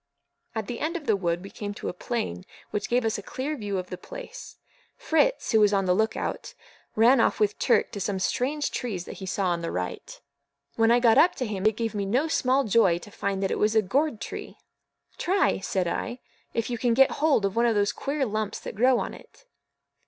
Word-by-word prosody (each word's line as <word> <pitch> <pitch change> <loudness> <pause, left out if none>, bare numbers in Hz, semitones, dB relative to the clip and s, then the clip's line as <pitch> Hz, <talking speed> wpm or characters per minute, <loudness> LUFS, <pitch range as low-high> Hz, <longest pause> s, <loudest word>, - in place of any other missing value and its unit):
At 220 -1 -2
the 235 +2 -5
end 330 +3 -1
of 310 - -10
the 220 - +3
wood 175 -2 -1
we 195 - -9
came 205 -1 -6
to - - -6
a - - -2
plain 180 - -3 0.3
which 210 - -3
gave 245 0 +2
us 220 -1 0
a - - -6
clear 270 +8 -4
view 205 -6 -3
of 185 -1 -5
the 180 - -5
place. - - -9 0.4
Fritz, 320 +11 +1
who 220 - +5
was 210 -1 +4
on 195 -1 +2
the 180 - +3
look 220 +4 +1
out, - - -4 0.4
ran 235 +4 +5
off - - +1
with 210 -1 +1
Turk - - +2
to 200 - -5
some 195 0 -1
strange 275 +10 -1
trees 195 -8 -3
that - - -9
he 190 - -6
saw 190 0 0
on 170 -1 -1
the 170 - -3
right. 90 0 -5 0.6
When 225 0 +3
I 240 +1 +5
got 235 -2 +5
up 350 - +5
to 255 - -2
him, 210 -2 -1
it 215 -1 +1
gave 230 -1 -2
me 200 -2 -2
no 255 +10 +1
small 270 -3 +2
joy 205 -6 +3
to 190 +4 -11
find 200 -1 -2
that 195 - 0
it - - -1
was 215 +1 +2
a 220 - +4
gourd 265 +4 0
tree. - - -7 0.6
"Try," 385 - +2
said 190 -1 -1
I, 240 +8 -3 0.3
"if 230 +1 -2
you 240 - -2
can 240 -1 +2
get 270 +1 +5
hold 295 -10 +3
of 195 +1 -2
one 235 +1 +3
of 230 - +2
those 205 0 +2
queer 280 0 -2
lumps 215 -2 -3
that - - -6
grow 250 +4 +4
on - - -3
it." - - -16
220 Hz, 235 wpm, -26 LUFS, 195-255 Hz, 0.6 s, who